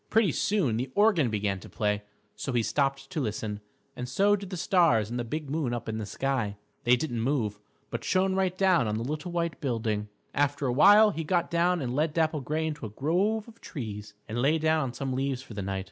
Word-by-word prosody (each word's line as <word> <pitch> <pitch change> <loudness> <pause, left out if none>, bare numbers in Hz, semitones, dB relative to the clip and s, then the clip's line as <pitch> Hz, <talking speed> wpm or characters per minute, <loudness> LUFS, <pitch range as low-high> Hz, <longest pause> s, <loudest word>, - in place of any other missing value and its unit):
Pretty 220 -6 +4
soon 155 - +1
the 125 +3 -2
organ 205 - +4
began 100 -3 -1
to - - -12
play, 105 -1 0 0.3
so 135 - -4
he 120 -2 +2
stopped 135 +1 -1
to 155 - -1
listen, 105 -3 -3 0.4
and 125 0 -5
so 200 +9 +3
did 200 -2 -7
the 185 - -5
stars 165 - +3
and 120 - -2
the - - -1
big 150 +6 -4
moon 135 -4 -1
up 120 - -6
in 110 0 -3
the 105 - -4
sky. 120 -5 -1 0.3
They 120 +1 +6
didn't 120 -3 -2
move, 115 -5 0 0.3
but - - -4
shone 190 0 +2
right 190 -1 0
down 185 - +3
on 105 0 -1
the 115 - -2
little 150 +6 -4
white 170 -1 -2
building. 110 -5 -1 0.2
After 145 0 +1
a 125 - +1
while 205 - +7
he 165 -1 -4
got 175 +2 0
down 170 0 +2
and 125 0 -2
led 150 +1 0
Dapple 160 -2 +1
Gray 155 +4 -1
into 150 -7 -4
a - - -9
grove 185 - 0
of 230 0 -16
trees 105 - -7
and 115 +2 -2
lay 150 +5 +3
down 160 0 +2
on 130 -4 -3
some 135 0 -3
leaves 135 0 -1
for 115 - -11
the 100 - -4
night. 95 0 -2
140 Hz, 230 wpm, -28 LUFS, 115-170 Hz, 0.4 s, while